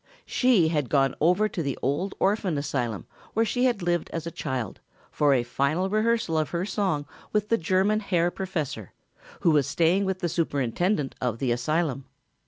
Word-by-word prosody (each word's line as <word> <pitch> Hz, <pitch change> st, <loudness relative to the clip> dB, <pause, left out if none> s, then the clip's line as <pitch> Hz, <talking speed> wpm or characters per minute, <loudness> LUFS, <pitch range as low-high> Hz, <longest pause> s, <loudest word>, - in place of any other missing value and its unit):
She 230 Hz, -11 st, +3 dB
had 150 Hz, -6 st, -1 dB
gone 135 Hz, -2 st, +3 dB
over 180 Hz, +7 st, +4 dB
to 190 Hz, -4 st, -4 dB
the 140 Hz, -4 st, -2 dB
old 150 Hz, +9 st, -1 dB
orphan 195 Hz, -5 st, +1 dB
asylum 130 Hz, -7 st, -2 dB, 0.3 s
where 225 Hz, +1 st, +3 dB
she 245 Hz, +4 st, +1 dB
had 235 Hz, -7 st, +1 dB
lived 175 Hz, -1 st, 0 dB
as 165 Hz, -1 st, -4 dB
a 170 Hz, -, -4 dB
child, 130 Hz, -8 st, -4 dB, 0.3 s
for 145 Hz, -1 st, +3 dB
a 130 Hz, -3 st, +3 dB
final 155 Hz, +10 st, 0 dB
rehearsal 215 Hz, -6 st, +1 dB
of 155 Hz, -, -1 dB
her 175 Hz, +1 st, -2 dB
song 190 Hz, -8 st, -1 dB, 0.3 s
with 210 Hz, 0 st, 0 dB
the 230 Hz, -, +3 dB
German 190 Hz, +5 st, +2 dB
Herr 175 Hz, -4 st, +1 dB
Professor, 155 Hz, -, -4 dB, 0.5 s
who 170 Hz, -, +4 dB
was 145 Hz, -4 st, +3 dB
staying 175 Hz, +4 st, +2 dB
with 190 Hz, -1 st, -1 dB
the 175 Hz, -, +1 dB
superintendent 155 Hz, -, 0 dB
of 125 Hz, -3 st, -1 dB
the 125 Hz, 0 st, 0 dB
asylum. 140 Hz, +2 st, 0 dB
165 Hz, 180 wpm, -26 LUFS, 140-195 Hz, 0.5 s, over